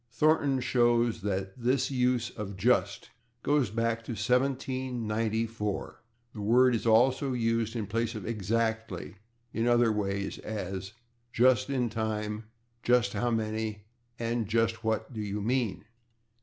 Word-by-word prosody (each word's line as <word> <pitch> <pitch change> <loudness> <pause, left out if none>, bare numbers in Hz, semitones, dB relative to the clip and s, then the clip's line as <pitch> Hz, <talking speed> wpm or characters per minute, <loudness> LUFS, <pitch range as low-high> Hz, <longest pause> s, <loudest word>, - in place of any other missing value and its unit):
Thornton 140 +1 +2
shows 120 -3 +2
that 95 -1 -2
this 125 +3 +1
use 125 -2 +1
of 100 -2 -6
/just/ 95 - +1 0.3
goes 145 -5 +2
back 115 +1 -1
to 120 - -4
1794. 115 -3 -1 0.3
The 105 - -6
word 125 +4 +5
is 115 0 -1
also 130 +4 +4
used 115 -1 0
in 110 -3 -2
place 115 +3 -1
of 105 - -5
/exactly/ 110 -3 -2 0.4
in 115 +1 0
other 120 -1 +4
ways, 100 -2 -2
as 95 -2 -5 0.4
in 120 - +4
/just 130 +1 +4
in 130 -3 +1
time/, 110 -1 -2 0.4
/just 125 0 +3
how 120 - 0
many/ 110 -2 -2 0.3
and 115 -2 -1
/just 115 +1 +1
what 110 +2 -2
do 110 - -4
you 105 0 -3
mean? 115 -1 -1
115 Hz, 135 wpm, -29 LUFS, 105-125 Hz, 0.4 s, word